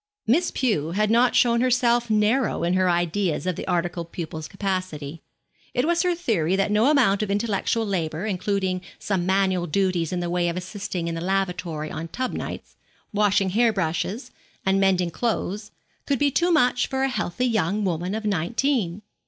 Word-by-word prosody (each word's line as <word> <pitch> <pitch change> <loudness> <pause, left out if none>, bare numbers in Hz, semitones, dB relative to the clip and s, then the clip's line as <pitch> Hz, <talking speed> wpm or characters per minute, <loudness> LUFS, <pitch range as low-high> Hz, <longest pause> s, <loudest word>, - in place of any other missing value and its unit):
Miss 320 +11 +3
Pew 170 - 0
had 215 +2 +1
not 240 +2 +4
shown 235 -1 +4
herself 240 -1 +2
narrow 215 +1 +2
in 170 +1 +1
her 185 0 +3
ideas 175 0 0
of 185 -2 0
the - - -6
articled 170 -1 -2
pupil's 160 -2 -5
capacity. 185 -6 -4 0.5
It 245 - +2
was 340 +1 +2
her 360 -1 +1
theory 190 - 0
that 195 +1 +1
no 215 +6 +4
amount 240 -10 +3
of 210 - -2
intellectual 210 +2 0
labour, 170 -3 -2
including 190 -2 -1 0.2
some 185 -3 -2
manual 190 -2 +1
duties 180 -1 0
in 180 - -1
the 175 - -2
way 175 -1 +1
of 170 - -3
assisting 185 -2 -4
in 170 - -2
the 165 - -4
lavatory 180 -4 -2
on 165 - -5
tub 255 +9 -3
nights, - - -6 0.4
washing 200 -2 +2
hair 230 +3 +3
brushes, 190 - -2 0.3
and 190 0 +3
mending 185 -3 +2
clothes, 210 -1 -2 0.4
could 280 - +1
be 285 +1 +2
too 345 +6 +2
much 250 -6 +3
for 265 0 -1
a - - +3
healthy 245 -1 -2
young 210 -3 0
woman 180 +2 -1
of 220 0 -4
nineteen. 210 - 0
195 Hz, 175 wpm, -24 LUFS, 175-230 Hz, 0.5 s, not